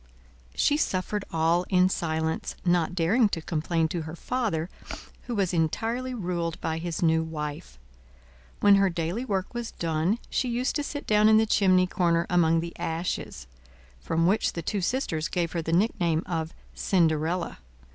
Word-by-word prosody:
She 295 - +3
suffered 200 -5 -1
all 165 +2 +2
in 185 -1 +4
silence, 160 -3 -2
not 175 -1 +2
daring 205 +7 +3
to 170 - -3
complain 165 0 0
to 170 - -2
her 155 +1 -7
father, 200 -7 -2 0.6
who 240 - -2
was 195 -3 0
entirely 225 +10 -1
ruled 175 -5 -3
by 160 0 -2
his 170 0 -3
new 160 -1 +3
wife. 155 0 -6 0.8
When 200 -1 +7
her 195 -1 +3
daily 170 +7 -2
work 195 -3 -2
was 240 -1 -4
done, 165 +5 0
she 255 - 0
used 245 +2 -1
to 295 - -1
sit 290 0 -5
down 210 0 +4
in 215 - +6
the 220 - +4
chimney 185 -4 +4
corner 170 -2 +1
among 165 -2 +3
the 170 0 -6
ashes; 170 - -3 0.5
from 165 - 0
which 195 +5 +2
the 170 - -5
two 200 +4 -2
sisters 175 - -1
gave 170 -2 -1
her 170 - -2
the 160 - -4
nickname 170 -3 +1
of 165 -2 -3 0.2
Cinderella. 165 - 0
175 Hz, 165 wpm, -27 LUFS, 165-205 Hz, 0.8 s, When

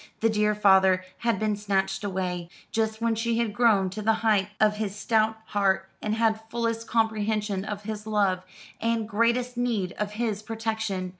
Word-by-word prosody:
The 225 0 +3
dear 210 0 +2
father 190 -2 +4
had 235 -3 +1
been 215 +1 0
snatched 195 -1 -1
away: 180 -3 -3 0.2
just 220 0 -1
when 230 0 +2
she 230 +1 0
had 230 -3 0
grown 205 -5 +3
to 215 +3 -5
the 220 +1 +3
height 205 -3 +3
of 210 -1 +3
his 210 -2 -3
stout 220 +1 +1
heart, 190 -2 +1
and 215 0 -1
had 220 -1 +1
fullest 230 -1 -2
comprehension 215 -3 0
of 210 0 -5
his 215 0 -6
love, 200 -4 +1 0.4
and 230 -1 0
greatest 235 +3 +1
need 225 -7 0
of 210 0 -2
his 215 -2 -2
protection. 220 -4 -3
215 Hz, 170 wpm, -26 LUFS, 200-225 Hz, 0.4 s, father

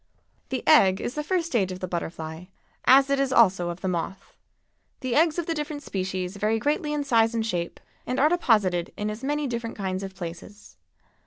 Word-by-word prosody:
The 260 -1 -4
egg 190 -11 +6
is 240 - -3
the 300 - -3
first 350 +1 0
stage 220 - 0
of 185 - -6
the 185 - -4
butterfly, 165 -1 -5 0.4
as 275 +1 +6
it 275 - +2
is 275 -1 +1
also 190 -8 +4
of 175 +1 -6
the 190 - -2
moth. 180 +2 -4 0.7
The 255 -2 -2
eggs 320 +2 +3
of 345 - -1
the 330 - -1
different 295 -1 -4
species 185 -1 -3
vary 215 +2 +1
greatly 295 +5 -1
in 295 -1 -1
size 230 -4 +3
and 225 -1 0
shape, 175 -6 -3 0.3
and 250 +2 -1
are 290 - +5
deposited 205 - +2
in 210 0 -2
as 215 +4 -8
many 295 +2 -1
different 235 -3 -4
kinds 190 -2 -3
of 195 -1 -7
places. 180 +4 -9
225 Hz, 200 wpm, -25 LUFS, 185-280 Hz, 0.7 s, egg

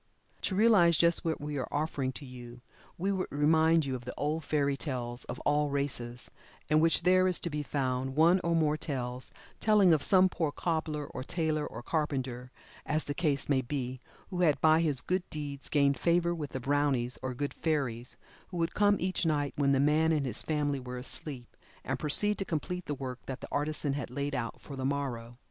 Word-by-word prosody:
To 190 - -1
realize 195 -6 +5
just 170 0 +3
what 160 -1 -1
we 145 -1 -4
are 130 - -3
offering 145 -3 -1
to 145 - -9
you, 120 -1 -10 0.4
we 195 +4 0
would 190 -1 -1
remind 160 +2 +3
you 135 - -2
of 125 -1 -5
the 125 - -7
old 155 +2 -1
fairy 140 -1 +1
tales 125 -4 -4
of 125 - -6
all 145 0 +2
races, 125 -4 -3 0.4
in 155 0 +4
which 165 +1 +3
there 185 +1 +5
is 180 - +2
to 170 - -3
be 150 0 -2
found 130 -2 -2
one 170 +4 +5
or 170 0 +1
more 155 -2 +2
tales 125 -4 -4 0.3
telling 205 -5 +5
of 155 - +2
some 185 +3 +5
poor 160 -5 -1
cobbler, 155 -2 -2
or 130 - -7
tailor, 155 0 -1
or 120 - -8
carpenter, 130 -5 -2 0.3
as 155 +1 0
the 145 - -3
case 145 -3 0
may 135 -2 +2
be, 130 0 -4 0.3
who 180 -1 -2
had 155 -5 +3
by 160 0 +5
his 145 -6 0
good 185 +5 0
deeds, 145 -2 -6
gained 140 -2 +2
favor 170 0 +2
with 155 -4 -5
the 130 - -2
"brownies" 135 -2 0
or 130 -1 -4
good 145 +3 -3
fairies, 130 -7 -2 0.3
who 180 - -7
would 165 0 0
come 205 0 +4
each 185 +1 -1
night 145 -3 0
when 140 -1 +2
the 135 - +3
man 155 +3 +3
and 150 -3 +1
his 130 - -2
family 145 -3 -1
were 125 0 -6
asleep, 125 0 -7 0.3
and - - -3
proceed 205 +8 +3
to - - 0
complete 180 +1 -3
the 145 - -3
work 130 -2 -6
that 135 0 -5
the - - -8
artisan 150 -1 -1
had 140 -4 -4
laid 140 +3 -3
out 120 -3 -3
for 140 - -9
the 130 - -5
morrow. 125 -4 -3
145 Hz, 205 wpm, -30 LUFS, 130-165 Hz, 0.4 s, realize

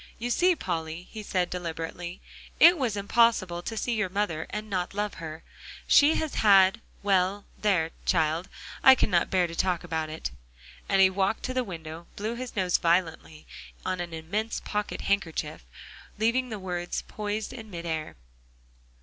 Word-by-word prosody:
"You 240 +2 -3
see, 360 +7 +4
Polly," 165 - -4
he 220 - -6
said 185 -3 -1
deliberately, 175 0 -5 0.4
"it 345 +2 +9
was 245 -9 -1
impossible 200 -4 +2
to 225 +5 -5
see 240 - -1
your 215 -4 0
mother 185 -5 -2
and 210 +1 -5
not 185 -2 -2
love 210 0 -1
her. 160 0 -7 0.4
She 295 +2 +6
has 315 -2 -2
had 195 -1 +5 0.2
well, 195 0 +2 0.2
there, 180 -6 +2
child, 165 +1 +1 0.3
I 265 - +9
cannot 180 -8 +2
bear 185 -2 +3
to 170 - -6
talk 180 -1 0
about 160 -1 -3
it," 155 - -5 0.6
and 195 -1 +4
he 190 0 +6
walked 195 +3 0
to 255 - -2
the 255 0 +1
window, 165 -4 -8
blew 215 +3 -3
his 245 +1 -6
nose 185 -3 +2
violently 165 -2 0 0.4
on 185 -1 -1
an 175 -1 -4
immense 190 +8 -3
pocket 210 0 -3
handkerchief, 175 - -2 0.5
leaving 235 +4 +1
the 215 - -4
words 180 -2 -3
poised 210 +2 -4
in 225 -4 -9
mid 170 -3 -7
air. 160 -2 -3
190 Hz, 165 wpm, -27 LUFS, 170-215 Hz, 0.6 s, it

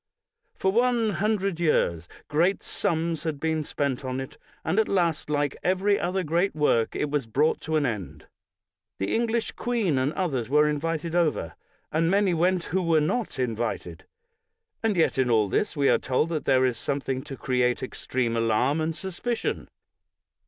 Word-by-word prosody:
For 190 - +1
one 235 0 +2
hundred 200 -2 0
years 85 - +1 0.2
great 170 +6 +1
sums 165 -4 -1
had 155 -3 -3
been 160 0 0
spent 140 -3 -2
on 130 0 -3
it, 130 - -8 0.3
and 180 +7 +1
at 220 - +2
last, 170 -6 0
like 145 -1 0
every 190 +3 +2
other 185 +2 -1
great 170 +4 0
work, 120 -7 +2
it 150 - -1
was 145 -5 -1
brought 145 +8 +1
to 160 - -2
an 150 -2 +2
end. 105 -8 -4 0.7
The 95 - -2
English 230 0 0
queen 220 - 0
and 130 +3 +1
others 135 - -2
were 150 +2 +4
invited 160 +2 -2
over, 160 - +1 0.4
and 165 +1 +2
many 195 -1 +3
went 175 +2 +2
who 190 +3 -1
were 165 -3 +3
not 215 +10 -1
invited. 120 -2 -3 0.8
And 225 -3 +1
yet 160 -5 +2
in 130 -2 +2
all 110 -3 +3
this 180 - -1
we 140 -1 +3
are - - +4
told 135 +5 0
that 160 -3 -3
there 130 0 +4
is 120 -2 -1
something 135 -1 -2
to 135 -3 -7
create 125 -1 0
extreme 125 -2 -2
alarm 115 +7 +2
and 160 0 -1
suspicion. 195 +7 -3
155 Hz, 170 wpm, -26 LUFS, 130-185 Hz, 0.8 s, were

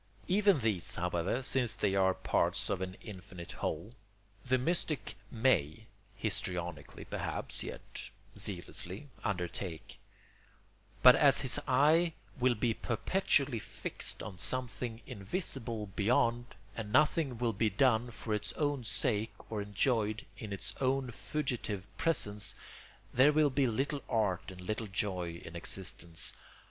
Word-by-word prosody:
Even 195 -5 +4
these, 105 -6 +1
however, 90 +8 0
since 125 -3 +2
they 100 -2 +1
are 95 -1 +3
parts - - +1
of - - -1
an 95 0 -4
infinite 90 -3 -9
whole, 85 +9 -3 0.5
the 130 +1 +2
mystic 155 +2 -1
may 110 - +2 0.3
(histrionically, 85 -5 -3
perhaps, - - -3
yet - - -7 0.3
zealously) 95 +6 -5
undertake; 90 -4 -3 1.0
but 125 0 +11
as 140 -1 +6
his 130 +1 +1
eye 155 +6 +4 0.3
will 125 -1 +3
be 115 +1 +1
perpetually 140 - +1
fixed - - -6
on 95 -5 -7
something 125 -1 -1
invisible 115 - -2
beyond, 115 +2 +2 0.3
and 105 -2 -5
nothing 145 0 +3
will 115 -1 0
be 110 +2 +2
done 120 +2 +3
for 110 -1 -4
its 105 -2 -2
own 145 -4 0
sake 110 -1 -2
or 105 -2 -1
enjoyed 110 +1 0
in 110 -3 -7
its 100 - -3
own 130 -1 +1
fugitive 120 -8 -3
presence, 105 -11 +1 0.6
there 130 +4 +6
will 150 -1 +4
be 135 0 +3
little 135 +5 -1
art 105 -6 +1
and 95 -1 -9
little 110 +4 -3
joy 90 -4 -1
in 80 - -9
existence. 85 -2 0
110 Hz, 130 wpm, -33 LUFS, 95-130 Hz, 1.0 s, but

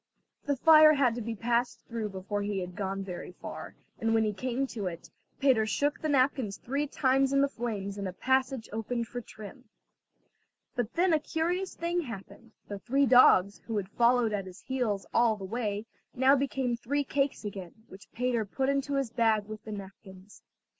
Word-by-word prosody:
The 285 - +2
fire 310 +2 +7
had 260 -4 +3
to 240 - -4
be 230 +1 -4
passed 235 +1 -1
through 230 -3 -3
before 195 +2 -4
he 205 0 -2
had 180 -1 -5
gone 195 0 -3
very 180 -1 -7
far, - - -8 0.2
and 225 0 +1
when 225 - +3
he 210 -1 0
came 255 +5 -2
to 220 -7 -5
it, 170 -1 -7 0.3
Peter 250 -6 +3
shook 285 +7 0
the 310 - -1
napkins 255 -6 +1
three 280 +4 -2
times 270 0 +2
in 275 0 +3
the 280 - +4
flames 210 -6 -4
and 200 - -3
a - - -4
passage 260 +1 0
opened 230 +1 -2
for 245 +1 -6
trim. 215 +4 -12 1.1
But 245 -2 -2
then 350 0 +3
a 315 - +4
curious 345 +5 -2
thing 345 +1 -1
happened; 230 - -10
the 205 -1 -6
three 275 +6 +2
dogs, 205 -6 +6
who 225 -2 -2
had 195 -2 -3
followed 235 0 +3
at 195 -2 -2
his 185 +1 -11
heels 230 -7 -2
all 235 -2 +4
the 195 - -7
way, 210 0 -3 0.3
now 265 +2 +5
became 265 -3 -1
three 285 +5 -1
cakes 275 -3 -1
again, 190 -4 -7
which 190 +2 -14
Peter 245 -2 0
put 265 +6 -2
into 275 0 0
his 270 -4 -1
bag 225 -3 +2
with 215 0 -9
the 220 - -7
napkins. 195 -1 -11
235 Hz, 190 wpm, -29 LUFS, 205-270 Hz, 1.1 s, fire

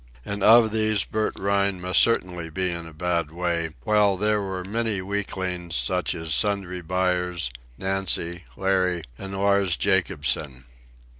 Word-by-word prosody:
And 100 0 -3
of 115 +1 +7
these 110 -2 +2
Bert 110 0 -2
Rhine 100 -1 +1
must 90 0 +2
certainly 90 -7 +1
be 90 +3 -1
in 85 -1 -5
a - - -10
bad 85 0 -1
way, 85 0 -1
while 105 -3 +3
there 105 +1 +1
were 95 -2 -4
many 110 +1 -1
weaklings, 95 -3 -3
such 90 -1 0
as 80 -2 -3
Sundry 95 -3 0
Buyers, 90 -3 -1 0.3
Nancy, 95 -3 -2
Larry, 95 -3 +1 0.2
and 95 0 -6
Lars 100 -2 +2
Jacobsen. 70 -2 0
95 Hz, 140 wpm, -25 LUFS, 85-100 Hz, 0.3 s, of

